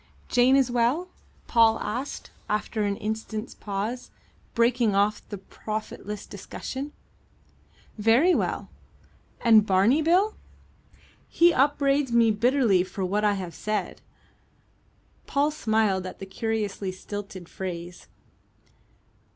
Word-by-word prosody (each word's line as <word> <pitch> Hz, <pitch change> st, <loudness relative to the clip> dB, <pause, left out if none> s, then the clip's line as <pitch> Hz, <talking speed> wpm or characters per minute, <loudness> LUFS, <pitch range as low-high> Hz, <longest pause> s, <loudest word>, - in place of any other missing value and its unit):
"Jane 250 Hz, +2 st, +4 dB
is 265 Hz, -3 st, +3 dB
well?" 245 Hz, +10 st, +1 dB, 0.4 s
Paul 225 Hz, -1 st, +4 dB
asked, 250 Hz, +6 st, -5 dB, 0.2 s
after 215 Hz, +1 st, -1 dB
an 200 Hz, -1 st, 0 dB
instant's 220 Hz, +1 st, -4 dB
pause, 210 Hz, +5 st, -4 dB, 0.5 s
breaking 235 Hz, -3 st, +2 dB
off 205 Hz, +1 st, +2 dB
the 205 Hz, -, -5 dB
profitless 210 Hz, +1 st, -6 dB
discussion. 260 Hz, +7 st, -7 dB, 1.1 s
"Very 235 Hz, -, +4 dB
well." -, -, -1 dB, 0.7 s
"And 225 Hz, -3 st, +6 dB
Barney 205 Hz, +9 st, +3 dB
Bill?" 365 Hz, +7 st, +3 dB, 1.0 s
"He 340 Hz, 0 st, +4 dB
upbraids 280 Hz, -1 st, +2 dB
me 230 Hz, -1 st, +4 dB
bitterly 230 Hz, -3 st, +3 dB
for 190 Hz, +1 st, -4 dB
what 205 Hz, +3 st, 0 dB
I 210 Hz, -1 st, +3 dB
have 180 Hz, -3 st, -6 dB
said." 210 Hz, +1 st, -3 dB, 1.3 s
Paul 290 Hz, +1 st, +1 dB
smiled 220 Hz, -9 st, 0 dB
at -, -, -8 dB
the 195 Hz, -, -7 dB
curiously 205 Hz, -1 st, -3 dB
stilted 195 Hz, -1 st, -8 dB
phrase. 175 Hz, -2 st, -7 dB
220 Hz, 110 wpm, -26 LUFS, 200-255 Hz, 1.3 s, And